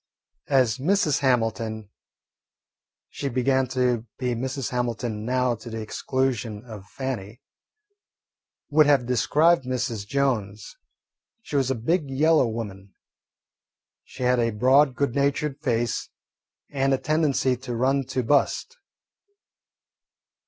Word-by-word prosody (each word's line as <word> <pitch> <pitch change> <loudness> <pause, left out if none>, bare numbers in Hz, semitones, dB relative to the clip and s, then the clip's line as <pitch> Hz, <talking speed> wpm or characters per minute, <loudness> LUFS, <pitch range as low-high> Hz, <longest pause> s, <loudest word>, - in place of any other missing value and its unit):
As 130 -3 +3
Mrs. 155 -1 +2
Hamilton 115 -5 -1 1.2
she 140 - -4
began 130 +1 +1
to 125 -2 0
be 125 -1 -1
Mrs. 130 +2 -3
Hamilton 120 -3 -2
now, 125 0 +1
to 115 +1 -9
the 115 0 -5
exclusion 120 -1 -2
of 105 -4 -10
Fannie 120 -4 -5 1.3
would 150 0 +5
have 140 -4 +4
described 150 +7 +3
Mrs. 125 -5 -3
Jones, 115 -6 -1 0.7
she - - -7
was 135 -2 +2
a 135 - +1
"big 145 +6 -1
yellow 150 +1 +3
woman." 100 -4 -7 1.1
She 130 - -8
had 125 0 +3
a 115 -1 +2
broad 130 +5 +3
good 140 -1 0
natured 140 +1 0
face 120 -4 -1 0.6
and 135 -1 +1
a - - -2
tendency 140 -2 +1
to 125 -1 -6
run 135 +3 +1
to 130 0 -2
bust. 145 - +1
130 Hz, 115 wpm, -25 LUFS, 115-140 Hz, 1.3 s, would